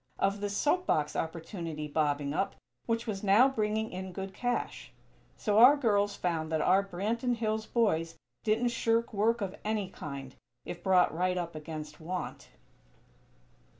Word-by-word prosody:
Of 200 +1 0
this 205 0 -2
soap 360 +5 +1
box 150 -1 +1
opportunity 165 -2 -4
bobbing 145 -1 0
up, 195 - -1 0.3
which 230 0 0
was 205 -3 -4
now 205 +6 +6
bringing 220 -3 -1
in 185 0 -6
good 195 +1 -5
cash. 245 +4 -3 0.5
So 210 -1 +2
our 260 +5 +9
girls 205 -6 +2
found 165 -4 -2
that 160 - +1
our 190 +5 +4
Branton 225 +6 -1
Hills 220 -1 -1
boys 165 -8 +1 0.3
didn't 225 +2 +2
shirk 230 0 +1
work 225 +3 +2
of 195 -1 -3
any 210 -3 -1
kind, 140 -5 -7 0.3
if 175 - -6
brought 180 -3 +4
right 180 +1 +1
up 170 -1 -3
against 155 -1 -7
want. 180 +3 -5
195 Hz, 150 wpm, -30 LUFS, 165-220 Hz, 0.5 s, our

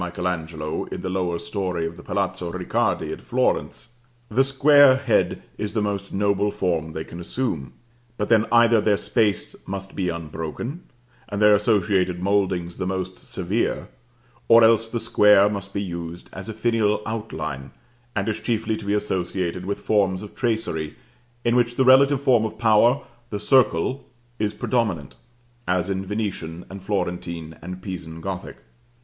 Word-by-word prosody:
Angelo 85 -3 -3
in - - -6
the 95 - -3
lower 90 -2 -1
story 90 -1 -2
of 80 +1 -5
the - - -11
Palazzo - - -2
Ricardi - - -1
at - - -9
Florence, - - -1 0.4
the 125 +5 +3
square 140 0 +6
head 135 +1 +1 0.2
is 105 - -3
the 110 - 0
most 100 -1 -3
noble 100 +1 +1
form 80 -5 -1
they 80 - -4
can 85 - -10
assume; 85 - -3 0.4
but 105 - -1
then 115 -1 +4
either 115 -1 +5
their 105 -1 +3
space 105 -5 0
must 95 0 -6
be 90 -2 -1
unbroken, 85 - -5 0.5
and 100 - -3
their 105 0 +6
associated 100 -4 +2
mouldings 95 -3 0
the 90 - -2
most 95 0 -3
severe, 95 +5 -2 0.6
or 115 0 +8
else 115 0 +5
the 115 +1 -3
square 105 -3 +5
must 100 -1 -4
be 100 - -2
used 85 -2 -7
as 95 +2 -7
a - - -4
finial 110 -2 +1
outline, 80 -12 -4 0.5
and 100 0 -1
is 110 - -1
chiefly 110 -2 -1
to 110 -1 -8
be 100 +1 +1
associated 90 -3 -2
with 100 - -2
forms 95 -2 +1
of 105 - -10
tracery, 110 - -2 0.5
in 120 0 +3
which 120 -1 +2
the 130 - +2
relative 135 +2 +6
form 125 -5 +4
of 110 0 -4
power, 120 +4 +4 0.3
the 105 - -3
circle, 130 0 +2 0.3
is 105 0 -1
predominant, 105 - -1 0.5
as 90 +1 +1
in 95 0 -2
Venetian, 95 -5 -4
and 95 0 -8
Florentine, 90 -4 -3
and 90 +1 -8
Pisan 85 -4 -6
Gothic. 95 +1 -6
100 Hz, 160 wpm, -23 LUFS, 90-110 Hz, 0.6 s, or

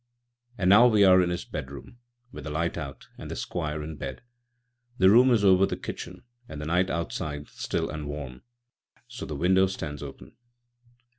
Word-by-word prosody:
And 95 -1 +3
now 115 +5 +8
we 105 -4 +4
are 95 -1 +7
in 90 - +1
his 90 0 -3
bedroom, 70 - -8 0.3
with - - -9
the - - -4
light 85 +3 -1
out 70 -2 -7
and - - -8
the - - -5
Squire 75 -3 -4
in 75 0 -7
bed. 65 - -7 0.7
The 95 +1 +6
room 125 +4 +6
is 110 -5 +3
over 95 0 +5
the - - -4
kitchen, - - -8 0.3
and 75 - -7
the 75 - -5
night 90 +4 +1
outside 75 -4 -4
still - - -3
and 75 -1 -6
warm, 70 -4 -7 0.7
so - - -8
the 75 - -5
window 95 +5 +3
stands 75 -6 -6
open. 70 -2 -10
85 Hz, 180 wpm, -27 LUFS, 75-95 Hz, 0.7 s, now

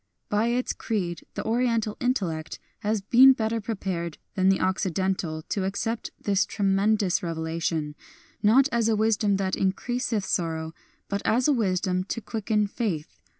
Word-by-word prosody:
By 210 +2 +2
its 245 +2 0
creed 180 -7 -3
the - - -4
Oriental 230 -2 +1
intellect 180 -11 -1 0.2
has 210 0 -1
been 250 +6 +7
better 225 -1 -1
prepared 185 -6 -3 0.2
than 190 0 +3
the 195 - +3
Occidental 185 -3 -1
to 195 - -2
accept 220 +4 -2
this 200 -1 +2
tremendous 200 -1 +1
revelation, 160 -2 -2 0.5
not 250 +6 +5
as 230 -1 +2
a 220 - +3
wisdom 210 -2 +2
that 190 -1 -1
increaseth 220 +2 -1
sorrow, 160 -2 -2 0.3
but 200 0 -2
as 245 +4 +2
a 295 - +4
wisdom 185 -5 0
to 230 - -3
quicken 215 -1 -1
faith. 200 -7 -4
200 Hz, 145 wpm, -26 LUFS, 185-225 Hz, 0.5 s, been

